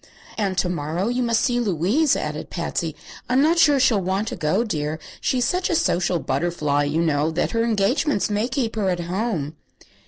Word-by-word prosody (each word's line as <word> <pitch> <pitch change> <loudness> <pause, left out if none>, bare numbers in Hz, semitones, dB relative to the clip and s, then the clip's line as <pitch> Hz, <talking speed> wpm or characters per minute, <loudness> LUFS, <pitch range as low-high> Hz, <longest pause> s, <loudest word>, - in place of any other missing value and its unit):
"And 195 -4 -1
to 180 - +2
morrow 170 +4 -2
you 245 +1 0
must 235 -2 +1
see 245 0 +1
Louise," 215 - +2
added - - -4
Patsy. - - -3 0.3
"I'm 255 +2 +3
not 325 +4 +3
sure 290 -4 +5
she'll 235 -6 +3
want 190 +4 -1
to - - -5
go, 180 +7 +1
dear. 155 -8 -2 0.2
She's 250 -2 0
such 360 +7 0
a 340 - +1
social 175 - +1
butterfly, 145 -1 0
you 155 +4 0
know, 150 -1 +1
that 160 +2 -1
her 230 -1 +1
engagements 230 - +1
may 210 +2 0
keep 245 -4 -2
her 205 -3 0
at 175 -1 -1
home." 175 -4 -2
195 Hz, 190 wpm, -22 LUFS, 165-240 Hz, 0.3 s, sure